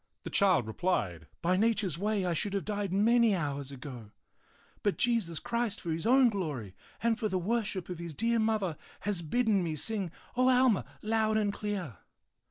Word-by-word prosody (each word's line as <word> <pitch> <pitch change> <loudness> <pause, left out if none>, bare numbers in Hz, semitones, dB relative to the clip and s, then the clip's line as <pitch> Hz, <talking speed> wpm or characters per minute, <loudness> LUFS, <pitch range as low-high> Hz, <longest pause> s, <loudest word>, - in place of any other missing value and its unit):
The - - -6
child 185 - +4
replied, 100 - -1 0.2
"By 180 +2 +3
nature's 205 -6 +1
way 205 -1 0
I 175 - +1
should 200 +5 0
have 195 - -2
died 205 -3 -2
many 225 +2 +4
hours 140 -5 -3
ago, 125 -5 -9 0.7
but 205 - 0
Jesus 225 -9 +1
Christ 235 0 -2
for 170 - -4
his 165 +6 -2
own 255 0 +6
glory 145 - -4 0.3
and 230 0 +2
for 215 -3 0
the 190 - 0
worship 200 -1 -1
of 180 -2 -6
his 170 -3 -6
dear 230 +4 +1
Mother 215 -7 0 0.2
has 205 -4 -1
bidden 210 +4 +2
me 160 -2 -2
sing 200 +3 -1 0.3
O 255 +1 +4
Alma 250 -4 +4 0.2
loud 220 0 +2
and 205 -2 +1
clear. 195 - -4
200 Hz, 180 wpm, -31 LUFS, 170-220 Hz, 0.7 s, own